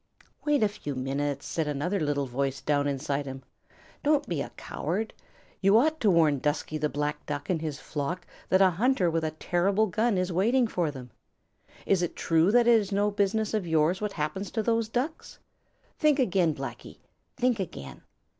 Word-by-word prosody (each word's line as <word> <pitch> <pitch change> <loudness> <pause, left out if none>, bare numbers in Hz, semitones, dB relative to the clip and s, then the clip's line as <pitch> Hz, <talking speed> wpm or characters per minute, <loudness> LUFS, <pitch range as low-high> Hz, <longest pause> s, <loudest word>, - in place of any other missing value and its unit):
"Wait 295 -5 +3
a - - +5
few 150 -8 -6
minutes," 140 +2 -2
said 160 -2 -2
another 150 +7 -1
little 145 -3 0
voice 135 +2 -2
down 145 0 +1
inside 140 0 -2
him. 135 0 -7 0.6
"Don't 295 -1 +2
be 165 -5 -2
a - - -4
coward. 200 +8 -3 0.5
You 195 +2 +5
ought 315 +6 +2
to 215 - +3
warn 160 -6 +4
Dusky 150 +2 -1
the 150 0 0
Black 150 0 -2
Duck 145 +3 -3
and 165 -3 0
his 155 -3 -4
flock 165 +5 -4 0.2
that 190 +1 +5
a 190 - +5
hunter 195 -1 +2
with 165 0 0
a 155 - 0
terrible 185 +6 +1
gun 215 +1 +1
is 180 0 -1
waiting 235 +8 +3
for 175 -7 -1
them. 130 -4 -9 0.7
Is 195 -3 +2
it 175 - -2
true 165 +3 +3
that 240 +1 +5
it 235 -1 +6
is 205 -1 -4
no 205 +1 +2
business 205 +2 0
of 210 -5 -1
yours 160 +4 +2
what 210 -1 -2
happens 175 +6 -3
to 220 - -2
those 230 -1 +1
Ducks? 260 +7 -3 0.6
Think 300 -2 +4
again, 185 - +2
Blacky; 130 -3 -7 0.4
think 250 -3 +1
again. 70 - -6
175 Hz, 185 wpm, -28 LUFS, 145-215 Hz, 0.7 s, it